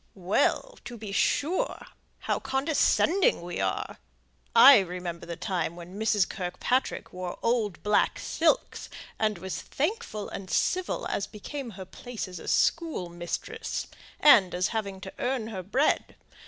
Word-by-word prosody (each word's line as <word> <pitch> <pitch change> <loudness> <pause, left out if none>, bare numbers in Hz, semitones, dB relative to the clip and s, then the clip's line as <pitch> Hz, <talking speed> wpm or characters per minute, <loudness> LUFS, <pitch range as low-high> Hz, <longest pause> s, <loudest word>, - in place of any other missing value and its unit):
"Well, 210 - 0
to 240 - -7
be 215 -2 -7
sure! 350 - 0 0.4
How - - -1
condescending 295 - +2
we 175 0 -5
are! 95 -1 -2 0.6
I 270 -3 +10
remember 175 -2 -5
the 170 - -4
time 175 -3 -2
when 175 +3 -9
Mrs. 215 -4 +2
Kirkpatrick 190 +8 -2
wore 180 -1 -5
old 225 -6 0
black 210 0 +2
silks, - - 0 0.3
and 215 -2 +1
was 185 +2 -5
thankful 305 - -3
and 190 -1 -7
civil 370 -1 0
as 200 - -2
became 260 +5 -7
her 190 - -7
place 245 +4 -7
as 180 -2 -8
a - - -10
schoolmistress, 175 - -1 0.3
and 200 -12 +6
as 180 +1 +1
having 200 -4 -3
to 190 -1 -8
earn 245 -3 -1
her 195 -4 -5
bread. 250 - +1
205 Hz, 140 wpm, -28 LUFS, 180-265 Hz, 0.6 s, I